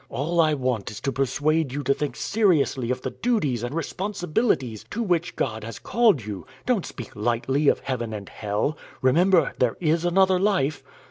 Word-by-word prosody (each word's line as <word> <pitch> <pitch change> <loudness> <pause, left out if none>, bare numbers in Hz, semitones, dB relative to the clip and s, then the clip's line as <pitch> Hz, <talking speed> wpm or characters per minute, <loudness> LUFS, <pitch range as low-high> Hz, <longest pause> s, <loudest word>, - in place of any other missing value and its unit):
All 165 +5 +1
I 155 -2 +3
want 125 -6 -1
is 105 - -8
to 135 - -1
persuade 140 +3 0
you 145 +2 -3
to 140 +1 +3
think 150 +1 -3
seriously 160 - +1
of 125 0 -2
the - - -2
duties 155 - 0
and 120 +5 -4
responsibilities 165 - -1
to 235 +3 -2
which 175 -4 0
God 110 -3 -2
has 115 -1 -7
called 215 - +2
you 100 -4 -6 0.2
don't 245 -7 +1
speak 120 -5 -9
lightly 120 +6 0
of - - +3
heaven 120 -4 -3
and 105 -2 -6
hell 105 +8 -2 0.3
remember, 170 +4 +4
there 125 -3 +1
is 165 0 +1
another 185 +1 +3
life." 180 -8 +1
145 Hz, 180 wpm, -24 LUFS, 120-175 Hz, 0.3 s, remember